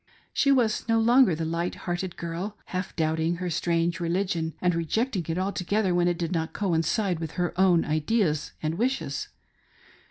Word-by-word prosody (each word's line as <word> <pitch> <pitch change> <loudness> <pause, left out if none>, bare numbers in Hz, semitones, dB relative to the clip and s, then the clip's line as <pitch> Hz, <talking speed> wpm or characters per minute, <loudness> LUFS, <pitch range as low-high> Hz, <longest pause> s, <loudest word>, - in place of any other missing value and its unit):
She 275 - +3
was 235 -4 +2
no 225 0 +4
longer 235 -4 +5
the 160 +1 -3
light 170 +2 -2
hearted 175 0 -3
girl, 175 +5 -4 0.2
half 185 +1 -3
doubting 160 +1 +1
her 180 0 -3
strange 170 +1 0
religion, 170 -2 -1
and 180 -1 +2
rejecting 185 - 0
it 165 - -1
altogether 190 +1 0
when 175 0 +3
it 175 -1 +1
did 170 -1 -2
not 160 -2 -2
coincide 185 0 0
with 160 -2 -5
her 180 -2 -1
own 180 -3 +4
ideas 155 +1 0
and 160 +4 -1
wishes. 260 +3 -1
175 Hz, 165 wpm, -26 LUFS, 165-200 Hz, 0.2 s, longer